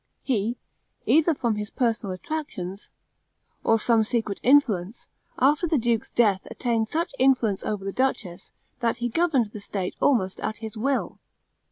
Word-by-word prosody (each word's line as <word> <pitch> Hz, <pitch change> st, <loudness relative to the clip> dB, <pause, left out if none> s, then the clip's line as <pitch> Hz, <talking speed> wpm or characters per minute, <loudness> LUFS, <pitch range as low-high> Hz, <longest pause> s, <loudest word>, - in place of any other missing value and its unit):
He, 235 Hz, -2 st, 0 dB, 0.5 s
either 320 Hz, +1 st, +4 dB
from 235 Hz, -5 st, -1 dB
his 210 Hz, -1 st, -4 dB
personal 225 Hz, -6 st, -1 dB
attractions, 195 Hz, -, -5 dB, 0.7 s
or 225 Hz, -, +4 dB
some 225 Hz, 0 st, +3 dB
secret 220 Hz, -3 st, -2 dB
influence, 230 Hz, -7 st, +2 dB, 0.3 s
after 295 Hz, +6 st, +3 dB
the 315 Hz, -2 st, +2 dB
duke's 230 Hz, -2 st, 0 dB
death 205 Hz, -5 st, +2 dB
attained 230 Hz, -3 st, -1 dB
such 330 Hz, +8 st, -2 dB
influence 250 Hz, -7 st, +3 dB
over 205 Hz, -2 st, -3 dB
the 195 Hz, -, -3 dB
duchess, 220 Hz, -9 st, -2 dB, 0.3 s
that 235 Hz, -2 st, 0 dB
he 240 Hz, 0 st, -2 dB
governed 265 Hz, -6 st, +1 dB
the 210 Hz, -, -7 dB
state 195 Hz, -2 st, -4 dB
almost 195 Hz, -9 st, +2 dB
at 220 Hz, -, -3 dB
his 220 Hz, 0 st, -7 dB
will. 265 Hz, +5 st, -1 dB
230 Hz, 150 wpm, -25 LUFS, 205-265 Hz, 0.7 s, either